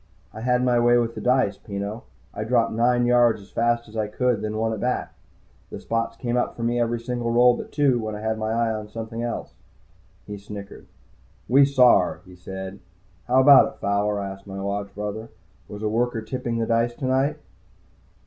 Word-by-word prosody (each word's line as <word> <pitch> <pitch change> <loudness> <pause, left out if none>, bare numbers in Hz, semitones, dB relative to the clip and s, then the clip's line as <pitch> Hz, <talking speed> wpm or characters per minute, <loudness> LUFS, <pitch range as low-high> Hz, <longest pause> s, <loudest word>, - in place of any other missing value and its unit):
"I 110 - -8
had 125 +1 +1
my 120 -1 +3
way 120 0 +4
with 115 -1 0
the - - -7
dice, 125 -6 +1
Peno. 100 +3 -6 0.3
I 105 - -4
dropped 115 +1 +1
nine 120 +2 +2
yards 120 -2 +4
as 100 - -16
fast 120 0 0
as 110 - -14
I 110 -1 -1
could, 120 0 0
then 110 0 -3
won 110 0 0
it 110 - -5
back. 125 +3 -2 0.6
The - - -7
spots 115 0 -2
came 120 0 -2
up 125 - -1
for 115 - -6
me 120 +1 0
every 120 0 0
single 120 0 -3
roll 120 +1 +5
but - - -8
two, 140 -5 +2
when 110 -1 -4
I 105 - -7
had 110 0 -2
my 110 0 -2
eye 115 0 +1
on 105 -1 -6
something 115 +1 -6
else." 120 0 -4 0.7
He 105 -1 -7
snickered. 100 0 -10 0.6
"We 135 +4 +6
saw 130 -3 +5
her," 90 - -3
he 90 - -14
said. 95 +2 -8 0.5
"How 130 +2 +4
about 140 0 +7
it, - - -27
Fowler?" 100 +1 0
I 100 -1 -4
asked 95 +1 -12
my 95 0 -6
Lodge 100 0 -3
Brother. 105 +2 -5 0.4
"Was 105 +1 -8
a - - +1
worker 115 +1 -1
tipping 120 0 -3
the 115 - 0
dice 115 +1 +1
tonight?" 135 +4 0
115 Hz, 205 wpm, -24 LUFS, 105-120 Hz, 0.7 s, about